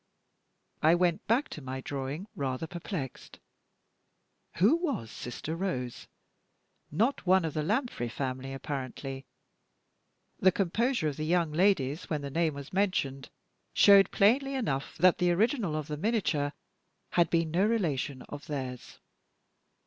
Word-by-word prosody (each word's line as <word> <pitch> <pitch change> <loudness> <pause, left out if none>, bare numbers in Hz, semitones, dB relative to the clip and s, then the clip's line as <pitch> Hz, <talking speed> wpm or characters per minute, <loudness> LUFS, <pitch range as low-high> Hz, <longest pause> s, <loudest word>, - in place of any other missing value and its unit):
I 160 +2 +6
went 175 -1 +1
back 240 +6 +2
to 155 - -8
my 130 0 -5
drawing, 140 +6 -4
rather 135 +1 -2
perplexed. 170 - -6 1.2
Who 210 - +4
was 280 - -3
"Sister 145 +6 -5
Rose"? 145 -10 -3 0.8
Not 220 - 0
one 185 -1 +5
of 160 - -3
the 155 - -1
Lanfray 210 - -1
family, 130 +1 -4
apparently. 135 0 -5 1.1
The 185 - +5
composure 205 - 0
of 145 - -3
the 155 - -2
young 170 -1 +2
ladies 160 -4 +1
when 150 -2 -1
the 140 - -5
name 160 -1 +1
was 140 +2 -9
mentioned 180 -9 0 0.5
showed 200 -2 +7
plainly 270 +7 +3
enough 140 - -2
that 185 -1 +5
the 180 - +3
original 210 - +1
of 155 -2 -3
the 150 -1 -4
miniature 165 -7 0 0.6
had 175 -1 +3
been 165 -2 +1
no 180 +4 +2
relation 145 - -1
of 145 -1 -9
theirs. 130 -4 -5
160 Hz, 135 wpm, -30 LUFS, 140-195 Hz, 1.2 s, showed